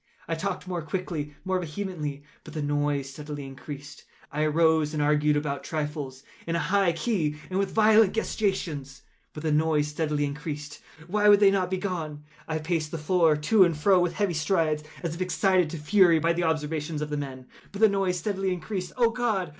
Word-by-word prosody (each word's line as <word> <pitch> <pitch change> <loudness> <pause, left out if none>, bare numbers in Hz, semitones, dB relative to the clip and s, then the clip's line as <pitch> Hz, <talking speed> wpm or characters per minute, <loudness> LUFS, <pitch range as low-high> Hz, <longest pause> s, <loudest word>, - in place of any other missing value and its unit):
I 165 - -1
talked 185 +2 -3
more 180 -2 -2
quickly—more 175 +1 -3
vehemently; 155 -4 -4 0.2
but 155 - -11
the 155 - -2
noise 145 -1 0
steadily 145 0 -7
increased. 140 +2 -9 0.3
I 150 - -2
arose 155 0 +3
and 150 - +1
argued 150 0 +3
about 140 -2 -2
trifles, 145 -4 -4 0.2
in 165 - -1
a 160 -2 -1
high 195 -4 +4
key 165 -5 -1 0.2
and 185 - 0
with 195 -1 0
violent 220 -2 +5
gesticulations; 165 -11 -2 0.3
but 150 - -9
the 155 - +1
noise 150 -1 +2
steadily 150 -1 -1
increased. 150 0 -6 0.2
Why 210 +4 +3
would 205 -1 +7
they 200 -1 +6
not 190 -2 +1
be 190 - -1
gone? 160 -6 -4 0.2
I 160 - -1
paced 155 -1 -1
the 165 - -4
floor 160 -1 +3
to 190 +7 +5
and 170 -4 +1
fro 185 +4 +4
with 175 -1 +1
heavy 200 -1 0
strides, 155 -1 +1 0.2
as 165 -2 -2
if 170 - -7
excited 185 -2 +2
to 165 - -5
fury 170 +2 +4
by 165 +1 +2
the 175 0 0
observations 155 -1 -1
of 150 - -6
the 150 - -1
men—but 135 +7 -8
the 220 - +7
noise 195 -3 0
steadily 195 +1 -1
increased. 180 +1 -4
Oh 235 -2 +4
God! 225 -7 -1
160 Hz, 190 wpm, -27 LUFS, 150-185 Hz, 0.3 s, would